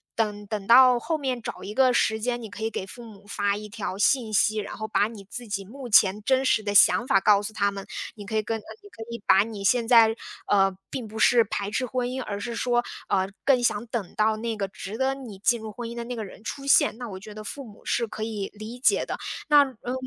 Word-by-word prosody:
等 210 -2 -2
等 210 -1 -4
到 250 +2 +7
后 315 +6 -2
面 260 -4 -3
找 - - -6
一 210 - -6
个 255 +1 +4
时 220 -2 +1
间， 240 +1 -1
你 220 - -8
可 220 - -8
以 220 - 0
给 190 - -5
父 240 +4 -10
母 210 -3 -14
发 205 -1 0
一 210 0 -8
条 205 -3 -5
信 225 +1 +2
息， 215 +1 +3
然 205 - -5
后 220 0 -4
把 210 0 +1
你 210 -4 -11
自 245 - -3
己 200 -2 -4
目 255 +4 -9
前 205 -1 +4
真 265 +2 +2
实 220 - +2
的 205 -1 -2
想 235 +4 +6
法 195 - +4
告 205 +1 +4
诉 205 - -4
他 200 -2 +1
们。 200 -1 -7 0.3
你 205 -2 -10
可 220 +1 -2
以 - - +2
跟 225 +1 -3
你 410 - -13
可 225 - -9
以 235 -1 -6
把 195 +1 +6
你 215 -3 -7
现 235 +2 +3
在， 225 -2 +6 0.3
呃， 195 -1 +3 0.2
并 255 -4 -5
不 220 +1 -8
是 235 +2 +5
排 200 -1 -4
斥 255 +5 -1
婚 250 0 -2
姻， 255 0 -4
而 200 -1 -5
是 235 +3 -5
说， 240 0 +1 0.3
呃， 190 -1 +1 0.2
更 255 -3 +3
想 220 -1 0
等 225 -6 -5
到 215 0 +2
那 225 0 -3
个 195 -2 -3
值 200 +2 -7
得 265 +1 0
你 240 -8 -9
进 235 +4 +2
入 220 0 -7
婚 235 0 -6
姻 235 - -7
的 235 0 -5
那 245 - -5
个 220 - -4
人 200 - -11
出 275 +3 -6
现， 275 -4 +4
那 245 -2 -6
我 190 -2 -7
觉 210 +2 -11
得 215 0 -8
父 275 +5 -7
母 210 -2 -15
是 235 - 0
可 215 0 -6
以 210 -3 -4
理 215 +4 -9
解 265 - +3
的， - - -4 0.3
那 290 -1 +7
嗯， 250 -1 -7
220 Hz, 280 characters per minute, -25 LUFS, 205-245 Hz, 0.3 s, 到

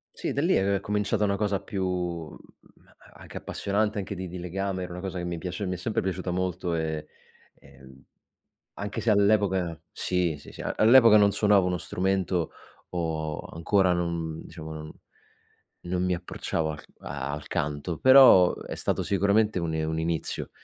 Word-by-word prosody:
Sì, - - -3
da 140 - -1
lì 180 - +3
è 100 0 +2
cominciata 105 +2 -1
una 100 -1 +1
cosa 100 -2 0
più 100 -1 -4
mhmm, 90 -3 -6
a - - -24
a - - -17
anche - - -9
appassionante 105 +1 -1
anche 100 0 -3
di 95 -1 -5
di 90 - -7
legame, 95 +2 -3
era 90 - -7
una 90 - -6
cosa 95 -1 -5
che 90 - -3
mi 85 -1 -4
piace 90 +3 -4
mi 90 - -2
è 90 - -4
sempre 105 +4 -2
piaciuta 95 -1 -3
molto 90 -1 -2
e, 80 -1 -3 0.5
ehm, 65 -1 -17 0.7
anche 100 0 -4
se - - -3
all'epoca 100 -5 +2
sì, 90 -4 -1
sì, - - -13
sì, - - -11
a - - -3
all'epoca 115 -1 +7
non 100 -1 +5
suonavo 105 -3 +4
uno 90 -1 0
strumento 90 -1 -1 0.4
o 80 -3 -2
ancora 90 +2 +2
non, 85 -2 -3
diciamo, 80 -2 -9
non 75 0 -8 1.0
non 90 +1 -1
mi 90 0 +1
approcciavo 85 -2 -3
al 75 0 -7
c - - -20
al 70 +1 -5
canto, 75 +3 -2
però 130 -9 +8
è - - -7
stato - - -1
sicuramente 100 +1 +2
un 85 -2 -2
i 80 0 -1
un 80 0 -2
inizio, 80 0 -2
90 Hz, 180 wpm, -27 LUFS, 80-100 Hz, 1.0 s, però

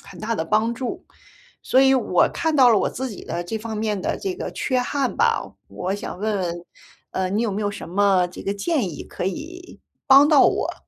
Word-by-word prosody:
很 - - -12
大 225 +2 -2
的 160 - -2
帮 215 +6 +1
助。 250 0 -5 0.6
所 260 - +2
以 265 0 +5
我 220 -8 +3
看 320 -2 -1
到 255 -3 +7
了 215 - +5
我 - - 0
自 260 0 -5
己 200 - -9
的 175 - -4
这 220 +5 -4
方 220 0 -6
面 210 -2 -1
的 - - -2
这 380 -2 -3
个 - - -5
缺 255 -2 0
憾 265 +1 -1
吧， - - +1 0.2
我 185 +2 -3
想 205 -2 -6
问 210 0 -1
问， 175 -1 -4 0.5
呃， 185 -1 -1
你 210 +4 0
有 230 - 0
没 205 - -3
有 205 -1 -1
什 200 - -8
么 190 0 +2
这 180 - -10
个 200 - -2
建 230 - -1
议 - - -8
可 180 - -5
以 340 - -7 0.3
帮 275 +1 +8
到 300 -3 +5
我？ - - +1
215 Hz, 245 characters per minute, -22 LUFS, 195-265 Hz, 0.6 s, 帮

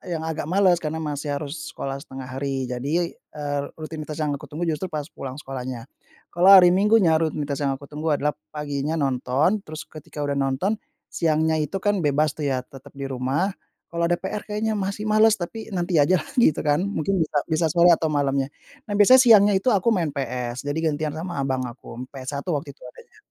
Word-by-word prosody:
yang 160 - -4
agak 160 -2 -3
males 180 -1 +3
karena 160 0 -3
masih 150 0 -4
harus 155 +2 -6
sekolah 135 0 -4
1/2 135 -1 -9 0.2
hari, 135 -2 -2
jadi, 150 +8 -1
eee, 145 -1 -4
rutinitas 155 -1 -6
yang 150 - 0
aku 140 - -5
tunggu 155 +4 -5
justru 165 +2 -1
pas 150 -3 -4
pulang 130 -1 -7
sekolahnya. 130 -4 -6 0.5
Kalau 180 +3 +4
hari 180 -2 +8
Minggunya 190 -4 +4
rutinitas 150 -3 -2
yang 140 -2 0
aku 140 +1 -13
tunggu 150 0 0
adalah, 150 +1 0 0.2
paginya 150 +1 -2
nonton, 140 +6 +1
terus 155 +1 -6
ketika 150 -1 -7
udah 140 -1 -1
nonton, 140 +11 0 0.3
siangnya 160 -1 +1
itu 155 +6 -3
kan, 205 -2 +2
bebas 150 -1 +2
tuh, 150 -2 -4
ya, 130 -2 -1
tetap 135 +1 -15
di 140 - -6
rumah, 135 +9 0 0.4
kalau 170 0 -1
ada 175 - +1
PR 200 +2 -4
kayaknya 215 +1 -1
masih 200 +2 -3
males, 215 0 +4
tapi, 215 +5 -6
nanti 175 -1 -1
aja 155 +5 +4
lah - - -8
gitu 195 - +4
kan, 150 +3 +2
mungkin 195 -1 -1
bisa 150 - -2
bisa 160 0 +1
sore 175 +1 +5
atau 160 -1 -1
malamnya. 140 -1 0 0.4
Nah, 205 - -2
biasanya 255 +6 +8
siangnya 210 -3 +7
itu 245 +6 +1
aku 200 +2 +1
main 170 -6 0
PS, 125 -2 -4
jadi 145 +2 -1
gantian 150 0 -3
sama 170 -1 -4
abang 130 -1 -1
aku, 120 0 -8
PS1 140 +1 -5
waktu 145 -1 -4
itu - - -36
adanya. 125 0 -14
155 Hz, 195 wpm, -24 LUFS, 140-175 Hz, 0.5 s, hari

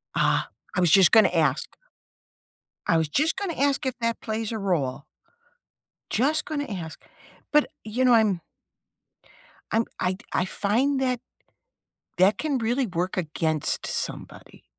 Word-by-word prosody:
Ah, - - +1 0.3
I - - +1
was 175 -3 +3
just 195 -2 +7
gonna 220 -3 +6
ask. 165 -3 0 1.1
I 170 - +4
was 160 -1 +1
just 300 - +1
gonna 390 -3 -2
ask 280 -1 +1
if 260 - 0
that 230 -1 -1
plays 220 0 -3
a 225 - -3
role. 155 -10 -1 1.1
Just 290 +7 +2
gonna 290 -2 -3
ask. 175 - -7 0.5
But, 300 0 +5 0.2
you 225 +4 -1
know, 250 -1 +5
I'm 210 -6 +3 1.3
I'm 225 +1 +2
I'd 185 +4 -2
I - - +1
find 250 +9 0
that, 255 -2 0 1.0
that 190 +3 +4
can 300 -3 -1
really 240 +3 0
work 180 0 -2
against 160 -3 -1
somebody. - - -5
220 Hz, 140 wpm, -25 LUFS, 180-260 Hz, 1.3 s, just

